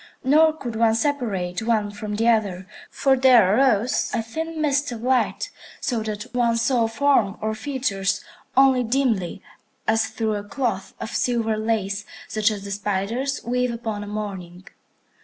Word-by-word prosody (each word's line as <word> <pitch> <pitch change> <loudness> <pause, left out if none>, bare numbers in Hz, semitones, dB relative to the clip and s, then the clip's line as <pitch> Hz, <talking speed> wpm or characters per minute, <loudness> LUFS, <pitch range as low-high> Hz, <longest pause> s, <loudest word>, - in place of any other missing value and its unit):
Nor 310 +4 +5
could 245 -7 -6
one 225 0 +3
separate 225 -10 -1
one 220 -2 0
from 210 0 -5
the 225 +2 +1
other, 200 -5 +1 0.2
for 270 -1 +2
there 245 -7 +5
arose 250 -2 +2
a 225 - 0
thin 320 +8 -5
mist 285 -3 +1
of 230 -1 -6
light, 255 0 +1 0.3
so 240 -4 -1
that 210 -1 -4
one 235 -2 +2
saw 235 0 +2
form 225 -4 +2
or 220 0 -1
features 215 -6 -1 0.3
only 265 -1 +6
dimly, 230 -7 0 0.4
as 220 0 +2
through 220 -2 -2
a 205 -1 -3
cloth 215 -2 -3
of 220 - -5
silver 230 -3 0
lace, 210 -2 -1 0.2
such 215 0 +1
as 205 -2 -5
the 200 - -6
spiders 205 +7 -2
weave 250 +1 0
upon 225 -3 -4
a - - -8
morning. 190 -4 -6
225 Hz, 160 wpm, -23 LUFS, 205-255 Hz, 0.4 s, only